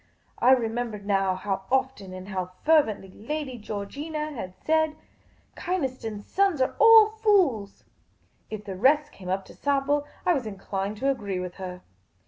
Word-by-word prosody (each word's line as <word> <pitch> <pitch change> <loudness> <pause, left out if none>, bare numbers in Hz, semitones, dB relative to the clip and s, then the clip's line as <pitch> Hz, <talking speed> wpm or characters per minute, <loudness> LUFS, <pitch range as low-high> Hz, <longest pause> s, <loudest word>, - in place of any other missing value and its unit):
I 255 +2 +6
remembered 225 -3 -1
now 195 -2 +2
how 190 0 -3
often 260 -7 0
and 185 +1 -8
how 185 -2 -4
fervently 225 -12 +3
Lady 260 +1 -5
Georgina 290 +10 -4
had 185 -8 -6
said, 315 -1 +1 0.3
" - - -35
Kynaston's 255 - -3
sons 390 -6 +1
are 260 - +1
all 450 -1 +9
fools." 355 - +2 0.7
If 215 -1 -6
the 195 -2 -5
rest 290 +8 +3
came 185 -2 -10
up 190 +1 -1
to - - -14
sample, 285 +1 0 0.2
I 355 - +4
was 260 -8 -2
inclined 195 0 -4
to 275 +5 +2
agree 200 -8 -3
with 180 -1 -5
her. 180 -1 -7
230 Hz, 155 wpm, -26 LUFS, 195-295 Hz, 0.7 s, all